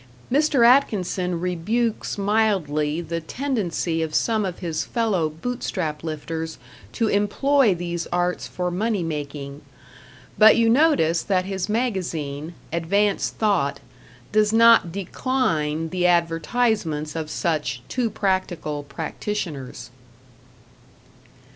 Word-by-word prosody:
Mr. 280 -3 +4
Atkinson 185 -8 +2
rebukes 210 +8 -1
mildly 190 -8 +1
the 165 0 -4
tendency 180 - -2
of 160 -1 -3
some 220 -3 +1
of 180 -2 -4
his 165 -4 -3
fellow 210 -9 0
Bootstrap 160 -4 -4
lifters 160 +1 -4 0.4
to 230 - 0
employ 215 +3 +2
these 175 -1 -4
arts 175 0 -1
for 180 -1 -3
money 205 +1 -1
making; 145 -2 -5 0.8
but 220 +2 +8
you 230 -1 +4
notice 235 - +3
that 185 -2 0
his 195 0 -3
magazine, 170 - -2 0.2
"Advanced 200 +5 +1
Thought", 200 -10 +1 0.5
does 215 0 +3
not 230 -5 +6
decline 170 - -1
the 180 0 +1
advertisements 170 -1 0
of 160 -2 -4
such 150 -7 -2
too 245 -3 -1
practical 185 -7 -1
practitioners. 145 - -5
180 Hz, 105 wpm, -23 LUFS, 160-220 Hz, 0.8 s, but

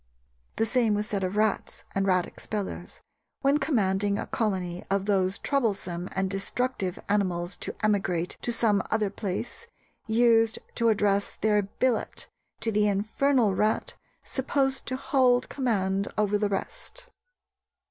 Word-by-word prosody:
The 225 - +1
same 225 -2 +2
was 210 +1 -1
said 200 -2 -2
of 185 +2 -2
rats; 215 -1 0
and 195 0 0
rat 185 -2 +3
expellers, 210 -3 -6 0.4
when 275 +2 +3
commanding 205 -8 +1
a - - -3
colony 185 -5 -2
of 195 0 +1
those 190 -2 +1
troublesome 195 -9 -1
and 190 0 +1
destructive 195 0 -2
animals 185 -3 0
to - - -5
emigrate 190 -5 +1
to 240 - -1
some 215 -4 +3
other 215 -2 +1
place, 210 - -5 0.4
used 225 0 +4 0.2
to 230 -1 +2
address 200 -2 +1
their 210 -1 +2
'billet' 225 +4 -1 0.3
to 225 - 0
the 210 0 +3
infernal 220 +3 +2
rat 215 +3 0 0.3
supposed 270 0 -1
to 260 - -1
hold 260 -2 +2
command 200 -7 0
over 210 -1 +2
the 210 -1 +1
rest. 485 - -5
210 Hz, 135 wpm, -27 LUFS, 195-235 Hz, 0.4 s, used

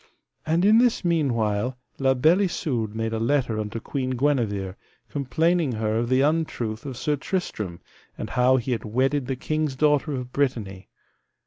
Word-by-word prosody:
And 165 +4 +2
in 215 +2 +6
this 240 -5 +2
meanwhile 125 -7 +1 0.2
La 135 -1 +3
Beale 160 +9 +4
Isoud 115 - -2
made 115 0 -2
a 110 - -1
letter 120 -2 +1
unto 105 +1 -4
Queen 130 +1 -3
Guenever, 110 -9 0 0.3
complaining 155 +2 +1
her 110 0 -1
of 120 0 -1
the 130 +1 +3
untruth 140 -7 -1
of 130 -3 -6
Sir 150 +3 0
Tristram, 110 - -3 0.4
and - - -5
how 125 +1 +4
he 125 +1 -2
had 120 - -1
wedded 130 +4 0
the 135 - -1
king's 155 +1 -2
daughter 150 +1 +2
of 125 -2 -5
Brittany. 110 -9 -2
130 Hz, 160 wpm, -25 LUFS, 115-150 Hz, 0.4 s, in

